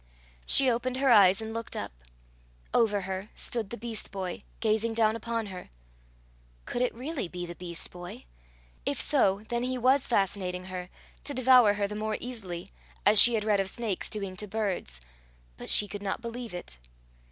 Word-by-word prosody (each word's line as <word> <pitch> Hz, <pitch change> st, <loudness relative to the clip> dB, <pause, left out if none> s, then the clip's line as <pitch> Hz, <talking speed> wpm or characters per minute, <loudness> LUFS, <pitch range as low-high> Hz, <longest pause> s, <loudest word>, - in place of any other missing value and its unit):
She 270 Hz, -, +7 dB
opened 250 Hz, +1 st, 0 dB
her 270 Hz, -1 st, +3 dB
eyes 195 Hz, -2 st, +6 dB
and 220 Hz, 0 st, -5 dB
looked 230 Hz, -1 st, -5 dB
up. -, -, -4 dB, 0.8 s
Over 210 Hz, -4 st, +3 dB
her 190 Hz, +2 st, -5 dB
stood 230 Hz, -4 st, -2 dB
the 235 Hz, -, -6 dB
beast 225 Hz, 0 st, -4 dB
boy, 190 Hz, -3 st, -4 dB, 0.2 s
gazing 225 Hz, +1 st, +1 dB
down 220 Hz, -1 st, +3 dB
upon 230 Hz, 0 st, -3 dB
her! 180 Hz, -, -9 dB, 1.0 s
Could 245 Hz, -, -3 dB
it 250 Hz, -, 0 dB
really 265 Hz, -, -4 dB
be 175 Hz, +1 st, -6 dB
the 175 Hz, -, -7 dB
beast 170 Hz, -1 st, -6 dB
boy? 175 Hz, -, -9 dB, 0.6 s
If -, -, -1 dB
so, 190 Hz, -, +2 dB
then 235 Hz, 0 st, -1 dB
he 255 Hz, +1 st, -1 dB
was 260 Hz, +3 st, +3 dB
fascinating 185 Hz, -4 st, 0 dB
her, 180 Hz, 0 st, -5 dB, 0.3 s
to 285 Hz, -, -3 dB
devour 250 Hz, -5 st, +6 dB
her 205 Hz, -1 st, 0 dB
the 210 Hz, -, -6 dB
more 215 Hz, +1 st, -2 dB
easily, 195 Hz, -7 st, -6 dB, 0.3 s
as 210 Hz, 0 st, +8 dB
she 240 Hz, -1 st, +8 dB
had 215 Hz, -, 0 dB
read 210 Hz, -2 st, +3 dB
of 195 Hz, -1 st, 0 dB
snakes 215 Hz, -3 st, -3 dB
doing 200 Hz, -3 st, -4 dB
to 210 Hz, -, -6 dB
birds; 190 Hz, -, -3 dB, 0.5 s
but -, -, -7 dB
she 205 Hz, -, +5 dB
could 205 Hz, 0 st, -7 dB
not 195 Hz, -1 st, -2 dB
believe 235 Hz, -3 st, -6 dB
it. 60 Hz, -, -8 dB
215 Hz, 180 wpm, -29 LUFS, 190-235 Hz, 1.0 s, as